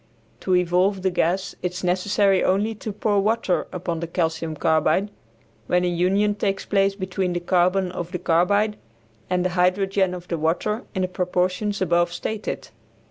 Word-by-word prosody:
To 185 Hz, -, +1 dB
evolve 180 Hz, +2 st, +2 dB
the 190 Hz, -, +2 dB
gas 180 Hz, +2 st, 0 dB
it 180 Hz, 0 st, -2 dB
is 185 Hz, -, -6 dB
necessary 190 Hz, +2 st, +2 dB
only 205 Hz, +4 st, +1 dB
to 215 Hz, 0 st, -6 dB
pour 205 Hz, 0 st, +1 dB
water 215 Hz, -3 st, 0 dB
upon 170 Hz, -2 st, -3 dB
the 170 Hz, -, -4 dB
calcium 160 Hz, -2 st, -2 dB
carbide, 160 Hz, +6 st, +1 dB, 0.6 s
when 180 Hz, 0 st, +2 dB
a -, -, +1 dB
union 190 Hz, +4 st, +2 dB
takes 195 Hz, -1 st, -2 dB
place 195 Hz, -1 st, +2 dB
between 185 Hz, -2 st, -2 dB
the 175 Hz, -, -1 dB
carbon 180 Hz, +1 st, +1 dB
of 175 Hz, -1 st, -5 dB
the 180 Hz, -, -2 dB
carbide 200 Hz, +6 st, +2 dB, 0.5 s
and 180 Hz, 0 st, +1 dB
the -, -, +2 dB
hydrogen 185 Hz, +1 st, +1 dB
of 175 Hz, 0 st, -9 dB
the 170 Hz, -, -3 dB
water 180 Hz, -, -1 dB
in 190 Hz, -, 0 dB
the -, -, +1 dB
proportions 185 Hz, +3 st, -1 dB
above 175 Hz, -1 st, +2 dB
stated. 215 Hz, +4 st, -4 dB
185 Hz, 170 wpm, -23 LUFS, 175-195 Hz, 0.6 s, evolve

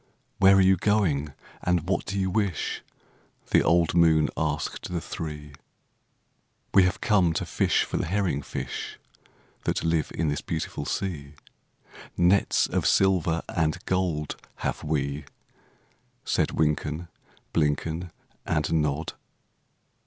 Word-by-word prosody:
"Where 95 Hz, 0 st, +7 dB
are 95 Hz, -, +6 dB
you 95 Hz, 0 st, +5 dB
going, 85 Hz, -7 st, +1 dB, 0.3 s
and 90 Hz, -2 st, 0 dB
what 95 Hz, -2 st, 0 dB
do 100 Hz, 0 st, -3 dB
you 95 Hz, -1 st, 0 dB
wish?" 100 Hz, -4 st, -1 dB, 0.7 s
The -, -, +6 dB
old 85 Hz, -1 st, +3 dB
moon 80 Hz, -3 st, +4 dB
asked 75 Hz, +2 st, -2 dB
the 90 Hz, -, -1 dB
three. 75 Hz, -3 st, -6 dB, 1.2 s
"We 95 Hz, -, +7 dB
have 90 Hz, +2 st, -1 dB
come 95 Hz, -7 st, +3 dB
to -, -, -2 dB
fish -, -, +2 dB
for -, -, -3 dB
the -, -, -1 dB
herring 90 Hz, -6 st, 0 dB
fish 65 Hz, -1 st, -5 dB, 0.7 s
That -, -, 0 dB
live 80 Hz, -2 st, 0 dB
in 80 Hz, -, 0 dB
this 75 Hz, -, -2 dB
beautiful 80 Hz, -2 st, -4 dB
sea; 75 Hz, -7 st, -3 dB, 0.8 s
Nets 90 Hz, +3 st, +3 dB
of -, -, 0 dB
silver 90 Hz, -4 st, +3 dB
and 80 Hz, -3 st, 0 dB
gold 85 Hz, -5 st, -1 dB, 0.3 s
have -, -, -2 dB
we," 75 Hz, -1 st, -2 dB, 1.0 s
Said -, -, +1 dB
Wynken, 75 Hz, +2 st, 0 dB, 0.5 s
Blynken, 80 Hz, +3 st, 0 dB, 0.4 s
And 75 Hz, 0 st, 0 dB
Nod. 75 Hz, 0 st, 0 dB
80 Hz, 125 wpm, -26 LUFS, 75-95 Hz, 1.2 s, Where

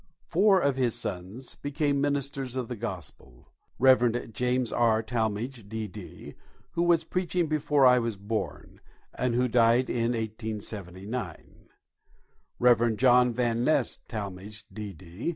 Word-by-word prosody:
Four 195 Hz, +3 st, +4 dB
of 140 Hz, -5 st, +1 dB
his 125 Hz, -4 st, +1 dB
sons 100 Hz, +7 st, -5 dB
became 145 Hz, -1 st, -1 dB
ministers 140 Hz, -2 st, -2 dB
of 125 Hz, -3 st, -3 dB
the 125 Hz, -, -3 dB
Gospel: 90 Hz, -, -8 dB, 0.2 s
Reverend 120 Hz, -2 st, +3 dB
James 125 Hz, +1 st, 0 dB
R. 115 Hz, -2 st, +3 dB
Talmage, 110 Hz, 0 st, -3 dB
D.D., 110 Hz, -3 st, -7 dB, 0.4 s
who 170 Hz, -, -1 dB
was 170 Hz, -1 st, +3 dB
preaching 180 Hz, +1 st, -1 dB
before 150 Hz, -2 st, +2 dB
I 125 Hz, 0 st, +7 dB
was 115 Hz, -3 st, -2 dB
born, 105 Hz, +2 st, -5 dB, 0.3 s
and 125 Hz, -2 st, -1 dB
who 125 Hz, +1 st, +2 dB
died 120 Hz, +1 st, +3 dB
in 120 Hz, 0 st, 0 dB
1879; 105 Hz, -3 st, -6 dB, 0.9 s
Reverend 120 Hz, -2 st, +4 dB
John 125 Hz, 0 st, +5 dB
Van 120 Hz, 0 st, 0 dB
Nest 140 Hz, -3 st, +1 dB
Talmage, 105 Hz, 0 st, -6 dB
D.D. 95 Hz, -, -6 dB
120 Hz, 125 wpm, -28 LUFS, 110-130 Hz, 0.9 s, I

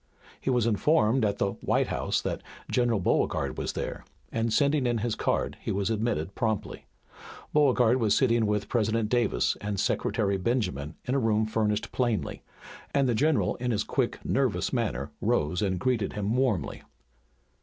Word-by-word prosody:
He -, -, -2 dB
was 125 Hz, -3 st, +2 dB
informed 115 Hz, +1 st, +3 dB
at 100 Hz, -1 st, +1 dB
the 100 Hz, -, 0 dB
"White -, -, +1 dB
House" -, -, -1 dB
that -, -, -3 dB, 0.3 s
General 120 Hz, -4 st, +2 dB
Beauregard 90 Hz, -, 0 dB
was -, -, -2 dB
there, -, -, -4 dB, 0.3 s
and 115 Hz, 0 st, 0 dB
sending 140 Hz, +1 st, +2 dB
in 120 Hz, -1 st, +1 dB
his 115 Hz, +1 st, -1 dB
card -, -, -1 dB
he -, -, -3 dB
was 100 Hz, +3 st, 0 dB
admitted 105 Hz, -6 st, -1 dB
promptly. 110 Hz, -3 st, -2 dB, 0.7 s
Beauregard 130 Hz, -5 st, +4 dB
was 110 Hz, -4 st, +3 dB
sitting 120 Hz, -4 st, +3 dB
with 105 Hz, -1 st, 0 dB
President 110 Hz, -1 st, 0 dB
Davis 120 Hz, -3 st, +1 dB
and 105 Hz, -1 st, -3 dB
Secretary 100 Hz, 0 st, 0 dB
Benjamin 90 Hz, -, -1 dB
in 125 Hz, -, -1 dB
a 140 Hz, -, +2 dB
room 110 Hz, -2 st, +2 dB
furnished 110 Hz, -1 st, -1 dB
plainly, 120 Hz, -4 st, -1 dB, 0.5 s
and 140 Hz, -1 st, +3 dB
the 120 Hz, -, +2 dB
general 150 Hz, +6 st, +2 dB
in 125 Hz, 0 st, -2 dB
his 105 Hz, -3 st, +1 dB
quick, -, -, -1 dB
nervous -, -, 0 dB
manner -, -, -1 dB
rose 80 Hz, +5 st, +1 dB
and 95 Hz, -3 st, 0 dB
greeted 115 Hz, -2 st, 0 dB
him 105 Hz, +2 st, -1 dB
warmly. 120 Hz, -, 0 dB
110 Hz, 165 wpm, -28 LUFS, 105-125 Hz, 0.7 s, Beauregard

